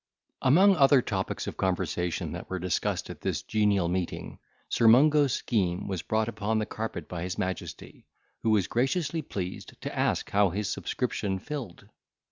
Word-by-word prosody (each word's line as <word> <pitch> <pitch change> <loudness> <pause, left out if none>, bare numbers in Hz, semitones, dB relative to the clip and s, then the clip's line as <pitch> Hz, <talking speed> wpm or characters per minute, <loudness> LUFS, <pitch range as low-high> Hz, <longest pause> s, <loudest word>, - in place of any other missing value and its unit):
Among 185 +9 +6
other 135 -3 +6
topics 95 -3 -2
of - - -6
conversation 90 -2 -1
that - - -7
were 95 - -2
discussed 90 -1 -1
at - - -11
this - - -2
genial 105 -4 +2
meeting, 90 0 -3 0.3
Sir 115 - +2
Mungo's 145 +4 +6
scheme 95 -6 -1
was 95 -4 -2
brought 110 0 0
upon 110 -1 -1
the 110 - 0
carpet 110 +1 -5
by 85 -2 -5
his 90 +1 -4
majesty, 95 0 -5 0.3
who 115 - 0
was 105 -4 +3
graciously 145 +6 0
pleased 95 -9 -6
to - - -6
ask - - 0
how 100 -1 +4
his 100 +3 -2
subscription 95 -2 -2
filled? 130 - -7
105 Hz, 160 wpm, -28 LUFS, 95-130 Hz, 0.3 s, Among